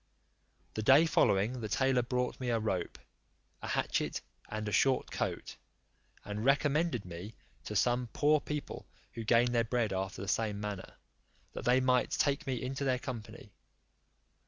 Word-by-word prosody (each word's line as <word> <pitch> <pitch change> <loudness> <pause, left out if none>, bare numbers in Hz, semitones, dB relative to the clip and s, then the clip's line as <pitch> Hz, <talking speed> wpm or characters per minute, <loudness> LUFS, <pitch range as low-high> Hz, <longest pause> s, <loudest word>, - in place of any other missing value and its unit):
The 110 - -2
day 135 +9 +6
following 120 -5 +2
the 110 - -4
tailor 130 +2 +2
brought 125 +1 -2
me 125 -1 -2
a 115 - +2
rope. 100 -5 -2 0.6
a - - -5
hatchet, - - -1 0.3
and 110 0 -4
a - - -2
short 130 +6 +2
coat, - - -3 0.7
and 105 +1 -4
recommended 140 - +2
me 90 +5 -8 0.3
to 105 - -5
some 120 +4 +2
poor 150 +1 +3
people 150 0 -5 0.3
who 115 - -5
gained 115 +2 +4
their 115 -1 +3
bread 115 -3 0
after 95 0 -3
the - - -6
same 105 -1 0
manner, 105 -2 -6 0.6
that - - -6
they 125 +1 +5
might 125 -1 +2
take 140 -2 0
me 130 -2 -1
into 135 +2 -3
their 130 -2 +2
company. 125 -4 -8
120 Hz, 160 wpm, -32 LUFS, 105-130 Hz, 0.7 s, day